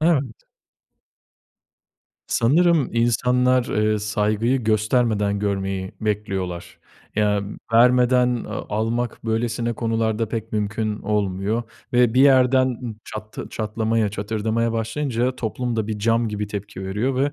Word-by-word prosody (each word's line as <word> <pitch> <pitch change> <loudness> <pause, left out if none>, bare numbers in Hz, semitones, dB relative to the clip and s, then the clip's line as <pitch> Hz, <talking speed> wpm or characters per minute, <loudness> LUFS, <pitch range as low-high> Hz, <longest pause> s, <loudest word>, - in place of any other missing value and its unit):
Evet. 145 -7 +2 1.9
Sanırım 160 +3 +3
insanlar, 125 +2 +2
eee, 105 -2 +1
saygıyı 105 +4 0
göstermeden 110 -1 +1
görmeyi 95 -2 -2
bekliyorlar. 95 -5 -3 0.4
Ya, 105 -1 +2 0.3
vermeden, 125 +1 +4
eee, 115 - -5 0.3
almak 115 +3 -2
böylesine 115 +1 -1
konularda, 115 -1 -1
pek 115 0 -5
mümkün 105 0 -1
olmuyor 105 +2 -1 0.3
ve 120 -1 +3
bir 130 - +5
yerden 130 -1 +5
ı 120 -2 -6
çattı 110 0 -7
çatlamaya, 110 0 0
çatırdamaya 110 +3 -1
başlayınca, 120 +2 -1
toplum 120 +1 -3
da 110 -2 -1
bir 110 -1 -3
cam 115 +2 +1
gibi 105 0 -3
tepki 100 -1 -6
veriyor 110 +8 -1
ve 140 +2 +1
115 Hz, 115 wpm, -22 LUFS, 105-125 Hz, 1.9 s, bir